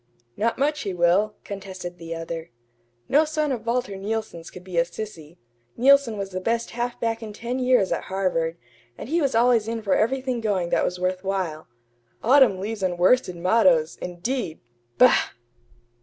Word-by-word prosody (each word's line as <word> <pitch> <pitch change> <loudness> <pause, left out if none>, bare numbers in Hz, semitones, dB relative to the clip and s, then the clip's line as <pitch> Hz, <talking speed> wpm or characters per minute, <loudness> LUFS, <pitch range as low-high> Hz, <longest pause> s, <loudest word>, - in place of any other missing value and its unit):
"Not 230 +2 0
much 295 +2 0
he 195 -3 -4
will," 180 +5 +2
contested 190 -3 -7
the 165 0 -6
other. 165 0 -6 0.6
"No 295 +3 +4
son 305 -1 -1
of 235 -3 -4
Walter 235 -4 -1
Neilson's 200 -4 -4
could 180 - -12
be 180 -2 -1
a - - +5
sissy. 170 -3 -9 0.4
Neilson 270 -3 +4
was 195 -1 -4
the 185 0 -4
best 230 +3 -1
half 240 +1 -3
back 230 0 -1
in 215 -2 -7
ten 240 +4 -4
years 250 -6 +3
at - - -2
Harvard, 175 -4 -1 0.4
and - - -8
he 335 +2 +1
was 275 -5 0
always 230 -2 +3
in 225 -1 -3
for 195 - +1
everything 255 +1 0
going 195 -6 0
that - - +2
was 180 0 -2
worth 185 +1 -1
while. 185 -5 -3 0.6
'Autumn 255 -5 +5
leaves 210 +2 -4
and 180 -2 -1
worsted 185 +1 +3
mottoes' 175 -3 +3
indeed! 180 +1 -3 0.4
Bah!" - - +5
205 Hz, 170 wpm, -24 LUFS, 180-235 Hz, 0.6 s, a